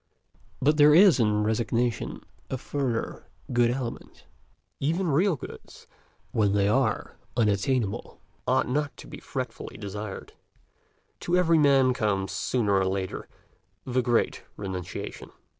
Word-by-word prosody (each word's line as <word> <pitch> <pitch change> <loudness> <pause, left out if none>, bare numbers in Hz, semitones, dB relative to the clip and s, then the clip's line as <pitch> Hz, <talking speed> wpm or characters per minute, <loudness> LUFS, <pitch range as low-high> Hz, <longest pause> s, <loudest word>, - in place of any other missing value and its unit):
But 150 +3 +3
there 150 0 +7
is 185 -4 +7
in 105 -2 +2
resignation 115 +2 -1 0.3
a 130 - -2
further 130 -3 -3 0.3
good 120 -1 +4
element: 120 -1 -5 0.5
even 165 +6 0
real 175 +5 +3
goods, 130 - -11 0.5
when 105 -3 +2
they 100 -1 +3
are 105 - 0 0.2
unattainable, 105 0 0 0.3
ought - - +2
not 145 +4 -1
to - - -11
be - - -9
fretfully 125 -4 -6
desired. 105 -1 -6 0.9
To 175 +1 +1
every 165 -2 +4
man 135 -3 +5
comes, 100 -5 -1
sooner 110 -6 0
or 95 -1 +3
later, 95 -1 -3 0.6
the 130 0 +1
great 120 -1 +1
renunciation. 95 -3 -6
120 Hz, 125 wpm, -27 LUFS, 105-140 Hz, 0.9 s, there